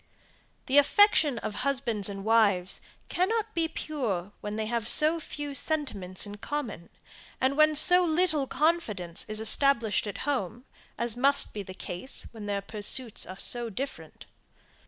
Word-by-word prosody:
The 275 +2 +4
affection 300 - +4
of 215 - -5
husbands 245 -7 -1
and 195 0 -7
wives 205 -5 +2 0.3
cannot 425 +4 -1
be 330 -1 0
pure 235 - -4
when 210 0 -5
they 220 0 -3
have 230 -1 -3
so 310 +6 +5
few 290 -2 -7
sentiments 250 - -2
in 205 0 -9
common, 230 - -6 0.5
and 265 +2 0
when 305 +1 +4
so 360 +4 +8
little 315 -4 0
confidence 245 - -1
is 215 0 -2
established 225 -2 +2
at 205 - -6
home, 245 -4 -3 0.3
as 235 -2 -2
must 275 +3 +4
be 210 - -5
the 185 -1 -10
case 185 +9 -4
when 215 -3 -9
their 200 -1 -2
pursuits 215 +3 -2
are 185 - -9
so 240 +2 0
different. 270 +6 -8
240 Hz, 150 wpm, -27 LUFS, 205-295 Hz, 0.5 s, so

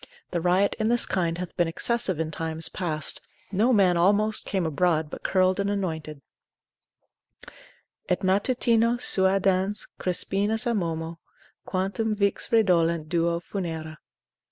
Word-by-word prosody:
The 175 - -2
riot 180 +3 +2
in 220 0 0
this 240 0 +3
kind 170 -3 -1
hath 180 -1 -7
been 175 -2 +2
excessive 190 +1 0
in 160 -1 -2
times 160 0 -2
past; 155 -4 -2 0.3
no 215 +6 +2
man 190 -6 +3
almost 205 +4 +4
came 190 -3 -1
abroad, 160 0 0
but - - -8
curled 185 0 +1
and 200 0 0
anointed, 160 -7 -4 1.9
Et 180 - 0
matutino 230 +4 +2
suadans 190 -1 +1
Crispinus 200 +5 0
amomo. 165 -7 -3 0.5
Quantum 195 +4 -2
vix 200 +4 -1
redolent 170 -7 +2
duo 170 0 0
funera. 160 -4 -6
185 Hz, 125 wpm, -25 LUFS, 165-205 Hz, 1.9 s, almost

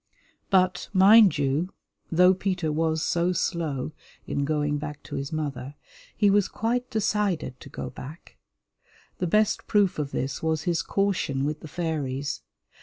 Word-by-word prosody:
But, 185 -2 +2
mind 200 0 +7
you, 145 +6 0 0.4
though 180 +2 +6
Peter 185 -4 -1
was 160 0 0
so 175 +1 +1
slow 160 -6 -2 0.3
in 140 - -1
going 150 -1 0
back 150 0 -7
to - - -7
his 140 0 -4
mother, 145 -3 -4 0.4
he 210 - +4
was 200 -1 +4
quite 245 +3 -2
decided 205 - -1
to - - -12
go 125 - -6
back. 145 +6 -11 0.8
The 180 - 0
best 215 +4 +2
proof 200 -6 +2
of 145 -2 -2
this 135 -1 -3
was 160 -1 0
his 170 -2 +1
caution 185 -9 0
with 150 +1 -2
the 155 - -9
fairies. 145 -4 -3
160 Hz, 150 wpm, -26 LUFS, 145-190 Hz, 0.8 s, mind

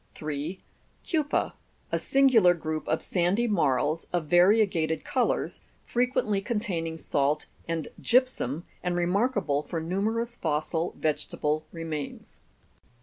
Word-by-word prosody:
3. 155 +4 -4 0.5
Keuper, 305 -4 0 0.4
a - - +1
singular 245 -10 +5
group 155 -1 -4
of - - 0
sandy 190 +6 +1
marls, 155 - +1
of 175 -3 0
variegated 175 -1 +3
colours, - - 0 0.2
frequently 240 -5 +1
containing 195 -8 -2
salt 145 -1 0 0.2
and 165 -2 -2
gypsum, 235 - +1 0.2
and 180 -1 -1
remarkable 175 - +1
for 165 +2 -4
numerous 220 +8 -1
fossil 160 0 -1
vegetable 155 0 -1
remains. 160 -3 -6
175 Hz, 105 wpm, -27 LUFS, 155-215 Hz, 0.5 s, singular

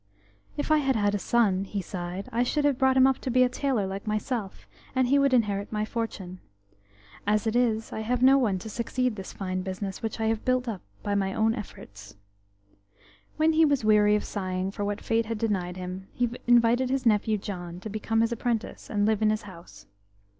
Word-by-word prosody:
"If 290 +1 -2
I 310 - +5
had 270 -2 +1
had 205 -2 +1
a 205 - 0
son," 200 -4 +2
he 200 +1 -4
sighed, 180 +1 -5
"I 235 - +1
should 290 +4 +1
have 280 -3 +2
brought 265 -1 +3
him 260 - +7
up 265 -1 +2
to - - -4
be 255 +1 +4
a 250 - +3
tailor 255 -5 0
like 195 +2 -6
myself, 215 -1 -3 0.3
and 260 -1 +3
he 280 +3 +4
would 275 -1 +3
inherit 205 -5 +1
my 215 -1 -1
fortune. 200 -5 -5 0.9
As 210 +1 +2
it 220 +1 0
is, 225 -3 +1
I - - -4
have 245 +3 -1
no 270 +1 +7
one 210 -7 +1
to - - -4
succeed 245 +3 -1
to - - -9
this 190 - -7
fine 185 -1 -3
business, 190 +1 -5
which 225 0 -4
I 220 - 0
have 220 0 0
built 255 0 +1
up 210 -6 -4 0.2
by 205 - -1
my 195 -1 0
own 220 +1 +2
efforts." 105 - -9 1.2
When 315 +1 +3
he 320 +1 +5
was 285 -7 +2
weary 210 -1 +5
of 210 - 0
sighing 185 -1 -3
for 205 - -4
what 205 0 -2
Fate 225 0 0
had 230 -1 -2
denied 190 -5 -2
him, 185 +1 -6
he 245 - +1 0.2
invited 240 +1 +4
his 265 -1 -1
nephew, 215 -1 +3
John, 175 -3 -6
to - - -6
become 220 +1 -1
his 230 +1 +1
apprentice, 235 -1 -3
and 205 -1 +1
live 220 0 +1
in 215 - +4
his 215 0 -1
house. 170 - -13
215 Hz, 220 wpm, -27 LUFS, 195-245 Hz, 1.2 s, him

